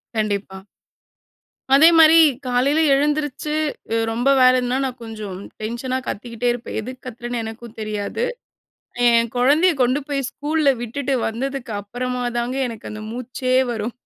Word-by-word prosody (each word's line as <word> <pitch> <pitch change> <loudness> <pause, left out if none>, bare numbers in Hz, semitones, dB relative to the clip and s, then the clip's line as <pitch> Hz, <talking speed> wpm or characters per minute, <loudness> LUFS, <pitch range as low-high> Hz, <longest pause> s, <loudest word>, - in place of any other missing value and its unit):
கண்டிப்பா. 200 -2 -2 1.1
அதே 300 +4 +8
மாரி 320 0 +8 0.3
காலையில 260 +5 +2
எழுந்திரிச்சு 295 +1 0 0.4
அ - - +2
ரொம்ப 240 +4 0
வேலைன்னா, 255 0 +4
நான் 255 -2 -5
கொஞ்சம் 215 -4 -7 0.2
டென்ஷனா 240 +4 -3
கத்திக்கிட்டே 230 +2 -4
இருப்பேன். 240 -1 -5
எதுக்கு 255 +3 -9
கத்துறேன்னு 240 0 -5
எனக்கும் 225 +1 -9
தெரியாது. 215 - -3 0.8
என் 235 0 +3
கொழந்தைய 295 +9 +4
கொண்டு 255 +3 +1
போய் 275 -3 -2
ஸ்கூல்ல 300 0 +1
விட்டுட்டு 265 +4 -3
வந்ததுக்கு 250 +1 -4
அப்புறமா 250 +4 -4 0.2
தாங்க 245 +2 -2
எனக்கு 230 -3 -8
அந்த 215 0 -7
மூச்சே 255 +1 -3 0.2
வரும். 225 +1 -4
245 Hz, 130 wpm, -21 LUFS, 225-275 Hz, 1.1 s, அதே